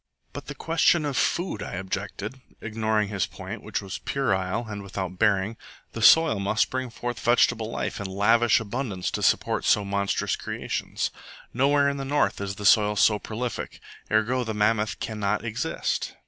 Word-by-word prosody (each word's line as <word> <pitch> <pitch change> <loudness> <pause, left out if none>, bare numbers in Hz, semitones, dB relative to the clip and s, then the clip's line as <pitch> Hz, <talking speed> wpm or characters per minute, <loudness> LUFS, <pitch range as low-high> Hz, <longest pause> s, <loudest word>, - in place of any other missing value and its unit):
"But - - -8
the - - -6
question 165 0 +2
of 145 -2 -2
food," 175 +8 0
I - - -6
objected, 100 +6 -5 0.2
ignoring 110 -2 -1
his 100 -3 -1
point, - - -8
which - - -4
was 95 - -6
puerile 100 -4 -1
and 105 -1 -6
without 95 -2 -5
bearing. 105 0 +2 0.4
"The 115 - -5
soil 140 -4 +6
must 100 +2 +1
bring 130 -1 -2
forth 120 0 -5
vegetable 120 -2 +2
life 115 - -3
in 100 - -4
lavish 110 +5 +3
abundance 110 -4 -3
to - - -3
support - - +2
so 105 - +3
monstrous 100 0 0
creations. - - -3 0.4
Nowhere 140 +3 +3
in 140 0 -1
the 135 - -4
North 145 -6 +1
is 100 0 -3
the 105 - -7
soil 105 0 +5
so 105 0 +4
prolific. 115 +4 -5 0.3
Ergo, 115 +4 +2
the 110 -2 -4
mammoth 105 +1 +1
cannot 105 0 -2
exist." 110 -7 -2
110 Hz, 165 wpm, -26 LUFS, 100-120 Hz, 0.4 s, soil